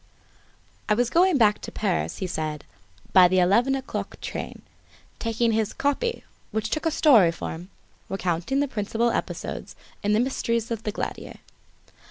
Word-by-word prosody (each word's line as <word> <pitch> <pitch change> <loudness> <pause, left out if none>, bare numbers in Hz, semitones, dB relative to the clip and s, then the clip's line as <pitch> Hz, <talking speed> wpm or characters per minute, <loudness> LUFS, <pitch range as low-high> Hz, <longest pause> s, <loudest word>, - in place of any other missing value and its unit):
I 210 - +4
was 245 +1 +1
going 355 -1 +4
back 210 -4 +3
to - - -7
Paris, 200 -4 -1
he 190 - -3
said, 155 -4 -4 0.5
by 185 -1 +8
the 185 +1 +1
eleven 230 +9 +4
o'clock 265 -1 -5
train, - - -6 0.6
taking 230 0 +1
his 220 -1 0
"copy," 285 - -1 0.3
which 220 0 -3
took 310 +1 0
a - - +4
story 245 - +5
form, 165 +2 -7 0.4
recounting 185 +7 -1
the 285 - +1
principal 230 0 0
episodes - - -4 0.3
in 205 0 +1
the 215 - +3
mysteries 235 -2 -1
of 225 -2 -2
the 215 - -3
Glandier. - - -5
220 Hz, 155 wpm, -25 LUFS, 190-260 Hz, 0.6 s, by